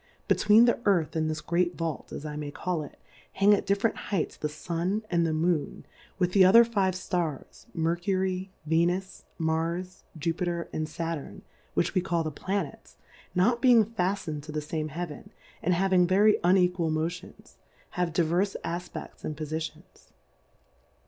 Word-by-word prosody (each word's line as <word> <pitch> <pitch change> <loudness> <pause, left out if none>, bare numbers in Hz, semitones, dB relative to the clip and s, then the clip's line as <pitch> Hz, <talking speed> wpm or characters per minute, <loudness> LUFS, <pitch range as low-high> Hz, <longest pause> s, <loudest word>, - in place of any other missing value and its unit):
Between 215 +2 +6
the 235 - +2
Earth 175 -7 +2
and 155 -1 0
this 155 -1 -3
great 175 +3 0
Vault 165 -4 -4
(as 150 - -6
I 150 -1 -5
may 150 -1 -4
call 170 +2 -2
it) 145 - -10 0.4
hang 200 +2 +5
at 200 - 0
different 200 +3 +1
Heights 195 -6 -1
th^Stiny 170 +7 -2
and 170 -1 +2
the - - 0
Moou^ 160 -1 0 0.3
with 180 -2 +1
the 195 0 +6
other 215 +6 +8
five 195 -5 0
Stars, 175 -6 -4
Mercury^ 185 +3 0 0.2
Ventis^ 175 +4 0
Marsj 165 +3 -2 0.2
Jupiter 170 +2 -2
and 155 0 -2
Sattirn^ 165 -1 -5 0.3
which - - +1
we 185 - +2
call 170 -2 0
tho 155 - -3
Planets, 185 0 -4 0.4
not 235 +7 +3
being 240 -4 +6
faftned 185 -7 -2
to 155 +2 -9
the 155 - -2
fame 155 0 -3
Heaven, 155 0 -6 0.3
and 180 +1 +2
having 185 -1 +3
very 205 +3 +4
unequal 180 -2 +3
Mo 155 +1 +1
tions, 170 - -11 0.3
have 180 -2 -1
divers 175 +4 +1
Afpefts 175 +2 -6
and 155 - -4
Pofitions. 155 +1 -7
175 Hz, 155 wpm, -28 LUFS, 160-190 Hz, 0.4 s, other